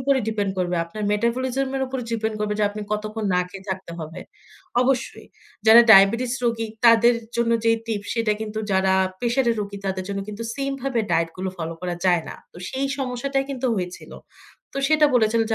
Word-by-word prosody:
উপরে 275 +1 +2
ডিপেন্ড 205 -3 -1
করবে। 180 -1 0
আপনার 210 +6 -8
মেটাবলিজম 255 +5 0
এর 265 - -1
উপর 260 0 -4
ডিপেন্ড 220 -1 -1
করবে 210 0 -1
যে, 210 - +3
আপনি 210 +1 -7
কতক্ষণ 215 +1 -3
না 180 - +3
খেয়ে 195 +1 -11
থাকতে 185 -2 -5
হবে। 160 +3 -7 0.6
অবশ্যই। 260 0 -1 0.4
যারা 225 +2 +10
ডায়াবেটিস 225 +5 +6
রোগী 225 -1 0 0.2
তাদের 235 +1 +6 0.2
জন্য 235 0 +1
যেই 225 0 +4
টিপস, 205 -3 -3
সেইটা 225 -2 +1
কিন্তু 215 0 -4
যারা 190 0 +3 0.3
প্রেশারের 240 0 +1
রোগী, 200 0 -5
তাদের 190 -1 -2
জন্য 200 0 -3
কিন্তু 210 +2 -6
সেইম 275 0 -2
ভাবে 265 -4 0
ডায়েট 165 0 +1
গুলো 185 0 -3
ফলো 165 -1 -4
করা 180 -1 -3
যায় 175 -3 +3
না। - - -7 0.2
তো, - - -15
সেই 270 +1 -1
সমস্যাটাই 270 +1 -1
কিন্তু 260 -1 -2
হয়েছিল। 180 -1 -5 0.6
তো - - -9
সেটা 305 -1 +5
বলেছিল 225 -1 +3
যে, - - +2
220 Hz, 190 wpm, -23 LUFS, 195-245 Hz, 0.6 s, যারা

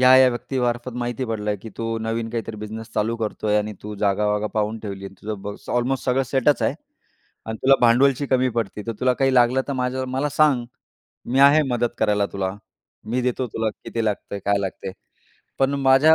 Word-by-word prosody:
या-या 130 0 +8
व्यक्तीमार्फत 120 0 -2
माहिती 120 +1 -2
पडलं, 105 -3 -2
की 110 - -8
"तू 115 0 -2
नवीन 115 +1 -2
काहीतरी 115 -1 -4
बिझनेस 110 +2 -7
चालू 110 +2 0
करतोय 105 -1 -1
आणि 105 +1 -2
तू 105 0 -6
जागावागा 105 +1 +1
पाहून 110 +1 0
ठेवली. 100 -2 -6
आणि 95 - -11
तुझं 105 -1 -4
ब 100 0 -5 0.2
ऑलमोस्ट 125 +2 0
सगळं 130 +1 +2
सेटच 135 +2 +2
आहे - - +1 0.7
आणि 110 - -3
तुला 135 +1 +6
भांडवलची 130 +4 +4
कमी 130 -1 +2
पडते, 105 -1 -3
तर 115 - -1
तुला 125 0 +3
काही 135 +1 +2
लागलं 125 +1 +4
तर - - 0
माझ्या 130 0 -1
मला 130 +3 -1
सांग. 140 -5 +3 0.6
मी 130 +2 +2
आहे 140 +3 +7
मदत 120 -1 +1
करायला 105 -2 +2
तुला, 95 -1 -1 0.5
मी 120 +4 -1
देतो 125 +1 0
तुला 110 -1 0
किती 115 -1 -2
लागतंय, 100 -1 -2
काय 100 0 +2
लागतंय." 95 -1 -4 0.7
पण 135 +1 +2
माझ्या 135 +4 +6
115 Hz, 185 wpm, -23 LUFS, 105-130 Hz, 0.7 s, या-या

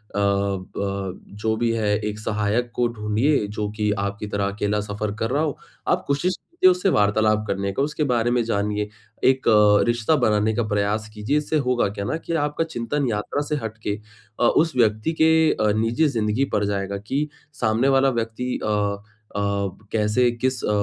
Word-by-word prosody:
अ, - - 0
ब 100 -1 -1 0.2
जो 110 0 +1
भी 115 0 +1
है 110 -2 0 0.2
एक 105 0 -3
सहायक 110 +3 -1
को 120 -1 +2
ढूँढिए 110 +4 +1
जो 105 0 -3
की 105 -1 +1
आपकी 100 +1 -3
तरह 100 -1 -1
अकेला 105 +1 -1
सफ़र 105 0 -3
कर 115 - 0
रहा 145 +3 +1
हो। 150 -3 -2 0.3
आप - - +2
कोशिश 170 +6 +1
कीजिए 335 - +2
उससे 180 +2 +1
वार्तालाप 105 - +2
करने 100 0 -1
का, - - -1
उसके 150 +1 -1
बारे 120 -3 +1
में 120 -1 +2
जानिए। 105 -1 -1 0.3
एक 130 0 +3
अ, 105 -1 +6
रिश्ता 120 +6 +2
बनाने 105 0 +2
का 120 - +1
प्रयास 105 +1 0
कीजिए 110 +8 0
इससे 150 +1 0
होगा 120 -5 +2
क्या 100 0 -5
ना 100 - -1
कि 170 - -5
आपका 150 +2 -1
चिंतन 145 -2 -2
यात्रा 105 +6 -2
से 150 - +1
हट 110 0 -5
के 105 - +1 0.4
अ, - - +1
उस 160 -3 +2
व्यक्ति 110 +5 +2
के 160 0 +5
अ, 105 -1 +1
निजी 115 +8 +2
जिंदगी 115 +1 0
पर 105 - +2
जाएगा 100 -1 -2
कि 135 +9 -2 0.3
सामने 115 +3 +2
वाला 135 0 +4
व्यक्ति 115 +3 -3
अ - - -1 0.7
अ, - - -1 0.5
कैसे 110 +3 +2
किस 130 +2 -2
अ, - - 0
110 Hz, 185 wpm, -23 LUFS, 105-130 Hz, 0.7 s, अ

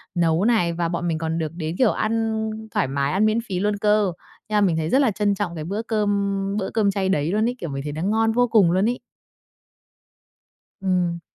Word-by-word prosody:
nấu 170 +2 +2
này, 180 -8 +2
và 170 0 -1
bọn 175 0 -2
mình 160 -1 0
còn 160 0 -2
được 155 -2 -2
đến, 160 -1 -4
kiểu, 250 -5 +4
ăn 225 0 -1 0.3
thoải - - 0
mái, 140 +1 -1
ăn 200 +3 +3
miễn 215 +1 +2
phí 185 -2 -2
luôn 205 +1 0
cơ. 210 -2 +2 0.4
Nha, 210 -1 +2
mình 175 -5 +2
thấy 160 0 -1
rất 265 - +3
là 255 -6 +3
trân 205 0 0
trọng 180 -4 -3
cái 155 - -5
bữa 200 +7 -3
cơm 205 -3 0 0.2
bữa 190 - -2
cơm 210 -3 +2
chay 190 -1 -1
đấy 155 -2 +1
luôn 215 +3 +1
ấy, 250 - -4
kiểu, 170 - -5
mình 135 0 -4
thấy 150 - -4
nó 155 - -5
ngon 220 +4 +2
vô 245 +2 +2
cùng 200 -7 +4
luôn 190 +5 +2
ấy. 245 - -3 1.8
Ừm. 180 -3 0
195 Hz, 230 wpm, -23 LUFS, 170-215 Hz, 1.8 s, kiểu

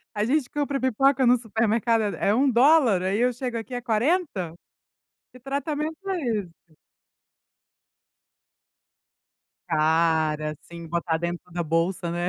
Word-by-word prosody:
A 210 - 0
gente 265 +1 0
compra 285 -1 -2
pipoca 260 +1 +2
no 250 +1 +5
supermercado 225 0 0
é - - 0
é - - +4
$1, 260 - +4
aí 195 +3 0
eu 250 +1 +3
chego 245 -1 -4
aqui 230 +3 -7
é 245 - -3
R$40? 235 - 0 0.8
Que 255 - -14
tratamento 290 +4 -3
é 375 -2 -1 0.2
esse?" 170 -3 -13 2.9
Cara, 155 -1 +1
sim, 170 -1 -11
botar 165 0 -1
dentro 170 +1 -5
da 175 0 -2
bolsa, 170 +2 -1
né. 175 +1 -2
225 Hz, 125 wpm, -25 LUFS, 170-265 Hz, 2.9 s, no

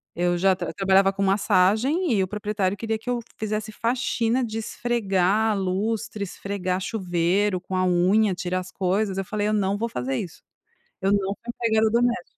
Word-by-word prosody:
Eu 175 0 +1
já 190 +1 +3
tra 180 -1 -4
trabalhava 195 0 +3
com 195 0 -2
massagem 215 - +2
e 200 - +2
o - - -2
proprietário 205 -1 -2
queria 220 +1 -2
que 245 - -7
eu 245 -1 0 0.2
fizesse 215 0 -3
faxina, 240 +1 0
de 220 -1 -4
esfregar 215 -2 +1
lustre, 200 +3 -2
esfregar 190 -1 -3
chuveiro 185 0 0
com 185 +1 -6
a 185 - +2
unha, 185 +3 +3
tirar 180 0 -2
as 185 0 -8
coisas. 195 +1 0
Eu 195 - -2
falei: 210 +1 -2
“Eu 215 - +1
não 200 -1 +1
vou 230 +3 -2
fazer 130 - -2
isso, 175 - -7 0.6
eu 195 +1 +2
não 205 - +4 0.2
sou - - -53
empregada 220 -2 +2
doméstica”. 240 +1 +2
200 Hz, 180 wpm, -24 LUFS, 185-220 Hz, 0.6 s, não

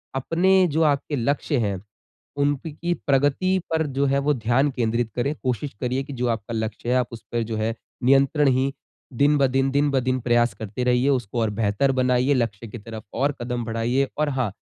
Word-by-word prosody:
अपने 170 +8 +2 0.2
जो 160 +2 +2
आपके 140 +1 -4
लक्ष्य 140 +3 0
हैं 100 -4 -1 0.6
उनकी 145 +4 -1
प्रगति 145 +7 +2
पर 160 -1 +1
जो 140 - +3
है 140 +1 +2
वो 145 +1 +1
ध्यान 125 +4 +1
केंद्रित 115 -2 -1
करें। 135 +4 0
कोशिश 130 +2 -2
करिए 130 +2 -1
कि 140 +1 -8
जो 125 -1 -1
आपका 115 0 -3
लक्ष्य 110 +1 -3
है 125 - +3
आप 125 - +1
उसपे 115 0 -4
जो 110 -1 -4
है 110 +1 -1 0.3
नियंत्रण 135 +3 +4
ही 135 +1 +2 0.4
दिन 145 +4 +3
ब 135 -1 +4
दिन, 135 +1 +1
दिन 145 +1 +2
ब 135 - +2
दिन 130 0 0
प्रयास 120 0 +2
करते 110 +3 -5
रहिए, 125 +2 +2
उसको 120 -4 -1
और 110 - +1
बेहतर 105 +5 +1
बनाइए, 125 +2 +2
लक्ष्य 115 -3 -2
की 110 - -8
तरफ 110 0 -9
और 140 +4 +1
कदम 120 0 -3
बढ़ाइए। 120 +4 0
और 150 0 +1
हाँ, 130 -6 -1
130 Hz, 195 wpm, -23 LUFS, 115-140 Hz, 0.6 s, नियंत्रण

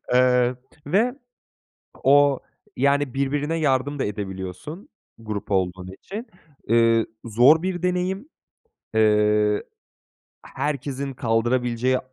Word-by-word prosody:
eee, 125 0 +3 0.3
ve 220 - +2 0.9
o, 140 0 +5 0.4
yani, 140 0 +1
birbirine 145 +4 -1
yardım 145 -1 0
da - - 0
edebiliyorsun 100 - -6 0.3
grup 105 -2 -6
olduğun 95 -1 -1
için. 220 +6 -7 0.4
Iıı, 115 0 +4 0.2
zor 125 +9 +5
bir 180 -2 -3
deneyim. 180 +7 -1 0.7
Eee, 110 - +3 1.4
eh - - -14
herkesin 140 -1 -3
kaldırabileceği 120 +2 +1
130 Hz, 95 wpm, -23 LUFS, 115-150 Hz, 1.4 s, o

